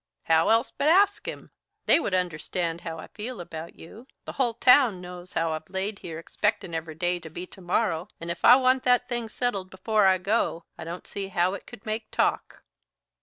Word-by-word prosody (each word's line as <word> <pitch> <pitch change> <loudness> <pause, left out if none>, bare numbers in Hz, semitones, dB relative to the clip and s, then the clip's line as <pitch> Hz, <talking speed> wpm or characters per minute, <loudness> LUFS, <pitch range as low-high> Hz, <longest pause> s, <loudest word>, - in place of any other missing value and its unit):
"How 160 0 +3
else 225 +3 +3
but 285 - 0
ask 400 +5 +4
'em? - - -7 0.3
They - - +5
would 200 - -1
understand 170 -1 -2
how 165 -1 -6
I 160 - -8
feel 225 +1 -7
about 165 -1 -8
you. 220 +10 -13 0.2
The - - -5
hull 245 -4 0
town 250 -5 +5
knows 180 0 -10
how 165 0 0
I've 155 0 -5
laid 195 +2 -3
here 165 -2 -7
expectin' 190 +1 -2
every 160 -1 -4
day 175 +2 0
to 160 - -10
be 175 +3 -7
to 190 - -15
morrow, 180 -1 0
and 170 +1 -4
if - - -7
I 245 - +9
want 260 0 +3
that 245 0 +3
thing 240 -3 -3
settled 205 -6 -2
before 200 +2 +2
I 190 0 +5
go, 185 -3 0
I - - -8
don't 170 +2 -7
see 200 -1 -5
how 180 0 +1
it 200 - -8
could 240 -1 -12
make 215 0 -4
talk." - - -1
190 Hz, 210 wpm, -26 LUFS, 170-230 Hz, 0.3 s, I